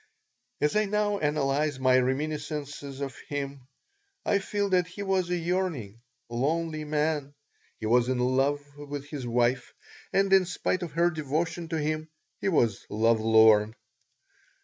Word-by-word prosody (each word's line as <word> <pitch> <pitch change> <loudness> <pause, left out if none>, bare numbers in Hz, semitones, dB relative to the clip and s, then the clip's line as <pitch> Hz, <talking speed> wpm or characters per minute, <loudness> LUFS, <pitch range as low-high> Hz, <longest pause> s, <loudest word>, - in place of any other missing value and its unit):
As 150 +4 +1
I 215 0 +3
now 205 0 0
analyze 150 -1 0
my 130 -1 +4
reminiscences 145 +1 -3
of 135 -2 -4
him 140 -2 -5 0.6
I 200 - +3
feel 205 +1 -1
that 180 -2 +2
he 190 +3 -7
was 190 -2 0
a 180 - +1
yearning, 165 - -2 0.3
lonely 155 +6 -1
man. 150 -1 -1 0.4
He - - -5
was 120 +2 +3
in 130 - +1
love 135 +3 +1 0.2
with 145 -1 -6
his 140 -5 -5
wife 120 +1 0 0.4
and, 195 0 +2
in 190 -1 +6
spite 180 +1 -1
of 175 -3 -5
her 170 +2 +3
devotion 165 +2 -2
to 165 0 -2
him, 155 +1 -2 0.3
he - - 0
was 115 - +2
love 115 +1 +2
lorn. 110 -1 +5
150 Hz, 150 wpm, -28 LUFS, 130-170 Hz, 0.6 s, in